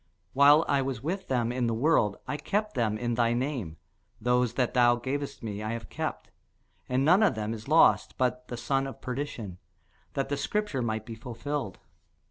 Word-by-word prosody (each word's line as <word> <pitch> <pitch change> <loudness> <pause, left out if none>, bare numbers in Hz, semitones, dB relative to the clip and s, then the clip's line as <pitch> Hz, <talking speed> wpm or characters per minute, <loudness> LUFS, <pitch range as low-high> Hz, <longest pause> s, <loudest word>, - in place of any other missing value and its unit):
While 145 +4 +6
I 140 - +2
was 130 -3 -3
with 185 +6 -3
them 120 -3 0
in 125 -1 0
the 115 - 0
world, 115 -6 +2
I 150 - -2
kept 205 +8 -1
them 110 -4 0
in 120 +1 -1
thy 115 0 +2
name: 120 - -3 0.4
those 125 0 +1
that 125 -2 0
thou 120 -1 +5
gavest 140 +3 -4
me 105 -2 -4
I 110 +1 -3
have 115 - -6
kept, - - -4 0.6
and 130 +2 +1
none 180 +7 +6
of 215 - +3
them 110 +1 -2
is 110 +1 -8
lost, 160 +3 +4
but 125 -1 0
the 120 - -5
son 135 +3 0
of 135 - -9
perdition; 125 -8 -5 0.5
that 135 0 -2
the 145 - -1
scripture 180 -1 -1
might 110 -2 -2
be 115 - -7
fulfilled. 120 0 -5
125 Hz, 190 wpm, -28 LUFS, 115-140 Hz, 0.6 s, While